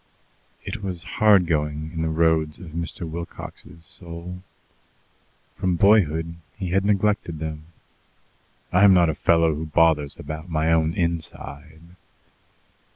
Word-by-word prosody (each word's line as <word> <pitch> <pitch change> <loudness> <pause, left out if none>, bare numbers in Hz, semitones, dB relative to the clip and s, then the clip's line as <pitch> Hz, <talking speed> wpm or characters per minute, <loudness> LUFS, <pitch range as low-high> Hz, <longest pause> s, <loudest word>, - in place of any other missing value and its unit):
It 115 - -6
was 90 -4 -5
hard 105 -4 +4
going 75 -1 -2
in 80 - -3
the 80 - 0
roads 80 -1 +1
of 85 -4 -11
Mr. 85 +1 -4
Wilcox's 85 +1 -9
soul. 85 +1 -8 1.1
From 90 -1 0
boyhood 85 -4 +3 0.2
he 95 -4 -4
had 95 +1 +2
neglected 100 -4 +1
them. 80 0 -6 1.1
"I 90 +3 +5
am 100 -2 +8
not 85 -3 +4
a - - -4
fellow 85 0 +3
who 80 +2 -5
bothers 80 -2 +2
about 80 +3 -7
my 80 0 +1
own 80 0 +2
inside." 80 -3 -4
85 Hz, 130 wpm, -23 LUFS, 80-90 Hz, 1.1 s, am